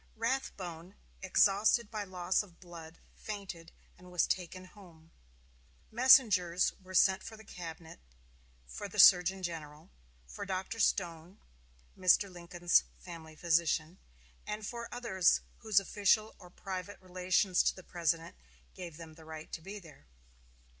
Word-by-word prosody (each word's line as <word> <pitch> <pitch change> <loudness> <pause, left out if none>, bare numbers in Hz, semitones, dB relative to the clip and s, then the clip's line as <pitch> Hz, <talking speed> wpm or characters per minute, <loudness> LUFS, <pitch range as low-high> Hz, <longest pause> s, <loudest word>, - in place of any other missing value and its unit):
Rathbone, 195 -7 -4 0.3
exhausted 205 +4 +3
by 210 -2 -4
loss 185 -1 0
of 180 -5 -15
blood, 170 -2 -11 0.2
fainted, 190 -6 -8 0.3
and 180 0 -14
was 180 - +2
taken 185 0 -3
home. 170 -4 -17 0.8
Messengers 215 - +5
were 185 0 -10
sent 190 +1 +4
for 220 - -9
the 220 - -14
cabinet, 165 -4 -9 0.7
for - - -7
the - - -10
surgeon 185 +2 +6
general, 160 -1 -7 0.3
for 135 - -8
Dr. 190 +3 -4
Stone, 175 -3 -1 0.6
Mr. 185 +2 +3
Lincoln's 175 - +1
family 160 - -11
physician, 170 +1 0 0.5
and 210 0 -4
for 235 +1 -6
others 220 -8 +2 0.2
whose 215 -3 +3
official 205 +2 +1
or 180 -2 -14
private 190 +2 -7
relations 185 0 +1
to - - +1
the 185 - -12
President 165 - -2 0.4
gave 170 -4 -9
them 165 -2 -11
the 160 0 -16
right 160 0 -9
to 160 - -6
be 195 +5 -8
there. 160 - -15
180 Hz, 135 wpm, -32 LUFS, 170-200 Hz, 0.8 s, surgeon